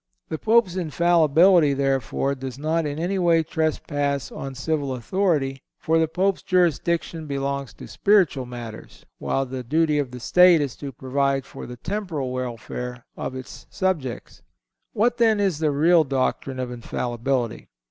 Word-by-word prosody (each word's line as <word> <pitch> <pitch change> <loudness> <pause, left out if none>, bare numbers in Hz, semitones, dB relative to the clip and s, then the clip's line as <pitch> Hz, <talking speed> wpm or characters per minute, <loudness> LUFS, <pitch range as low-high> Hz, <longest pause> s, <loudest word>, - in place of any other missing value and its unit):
The 160 - -3
Pope's 220 -5 +3
Infallibility, 170 -1 +4
therefore, 135 -1 0
does 130 -1 -7
not 155 +2 0
in 145 0 -4
any 180 +4 -1
way 170 -2 +3
trespass 145 -3 -1
on 135 -1 -6
civil 140 0 -1
authority; 135 - 0 0.2
for 165 +1 +1
the 160 - +2
Pope's 190 +4 0
jurisdiction 170 -2 0
belongs 140 -1 -3
to - - -10
spiritual 180 -11 +2
matters, 120 -3 -9
while 135 - -1
the 130 0 -5
duty 150 +3 +1
of 140 -3 -1
the 125 0 -9
State 180 +6 +6
is 140 -4 -2
to 140 -2 -6
provide 135 +1 -1
for - - -9
the 125 0 -8
temporal 165 - -3
welfare 125 0 -5
of 130 - -5
its 130 -1 -9
subjects. 160 -11 -3 0.5
What, 240 +3 +2
then, 225 -3 +3
is 190 -7 +1
the 155 -1 +2
real 160 +4 +4
doctrine 135 -1 -1
of 125 -1 -3
Infallibility? 120 0 -3
145 Hz, 150 wpm, -23 LUFS, 130-170 Hz, 0.5 s, State